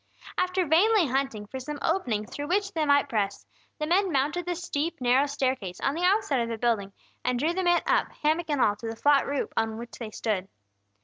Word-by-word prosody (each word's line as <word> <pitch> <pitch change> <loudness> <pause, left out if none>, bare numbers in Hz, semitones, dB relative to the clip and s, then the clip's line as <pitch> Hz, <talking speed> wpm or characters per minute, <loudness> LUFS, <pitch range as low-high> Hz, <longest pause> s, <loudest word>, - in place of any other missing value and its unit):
After 365 0 +1
vainly 370 +5 +4
hunting 265 -5 -1
for 265 +6 -7
some 295 +3 -5
opening 245 - 0
through 290 +6 -6
which 395 +3 0
they 315 -2 0
might 285 0 +4
press, 205 -3 -2 0.3
the 305 - -2
men 370 +4 +2
mounted 305 +5 0
the 355 - -1
steep, 335 -2 -3
narrow 255 +3 +3
staircase 260 -10 -2
on 275 - 0
the 330 - -4
outside 370 - +2
of 230 - -2
the 230 - -3
building, 220 -4 0 0.3
and 250 - 0
drew 310 +7 +1
the 375 - -1
man 350 -1 +3
up, - - +2
hammock 315 +2 +1
and 290 -2 0
all, 205 - +3
to 230 - -7
the 225 - -4
flat 285 +4 +3
roof 280 -1 -2
on 225 0 0
which 235 +1 -9
they 230 -3 -5
stood. 210 -3 -2
285 Hz, 220 wpm, -27 LUFS, 235-345 Hz, 0.3 s, vainly